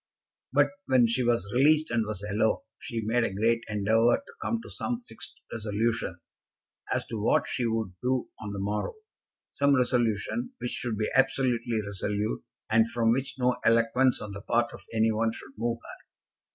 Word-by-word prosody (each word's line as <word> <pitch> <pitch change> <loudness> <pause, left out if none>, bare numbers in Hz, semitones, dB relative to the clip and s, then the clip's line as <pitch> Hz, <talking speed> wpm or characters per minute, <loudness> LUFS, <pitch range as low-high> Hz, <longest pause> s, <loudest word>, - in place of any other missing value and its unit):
But 145 +2 +4 0.2
when 130 -2 +5
she 115 +3 +1
was 115 -5 +1
released 150 +4 +4
and 115 -2 +1
was 105 -2 -5
alone, 110 +2 +1 0.2
she 115 -2 -4
made 120 +2 +2
a - - 0
great 115 +4 +1
endeavour 110 +3 +3
to 280 - -14
come 230 - 0
to - - -10
some 245 -1 -2
fixed 245 - -9
resolution 110 -3 -1 0.7
as - - 0
to 110 -3 -5
what 110 - +2
she 120 - -1
would 110 -4 -1
do 125 0 0
on 105 -2 -5
the 100 - -5
morrow, 105 +2 -2 0.6
some 140 0 +3
resolution 125 - +1
which 125 - -3
should 115 -3 -3
be 110 - -1
absolutely 125 -4 +2
resolute, 100 -5 -2 0.2
and 110 +1 +4
from 115 -1 +2
which 135 +2 -1
no 125 -1 +2
eloquence 115 +3 +3
on 105 - -6
the 100 0 -7
part 120 +3 +1
of - - -10
any 110 0 +3
one 110 +1 +1
should 135 - -11
move 115 +1 -1
her. - - -12
115 Hz, 180 wpm, -28 LUFS, 110-125 Hz, 0.7 s, when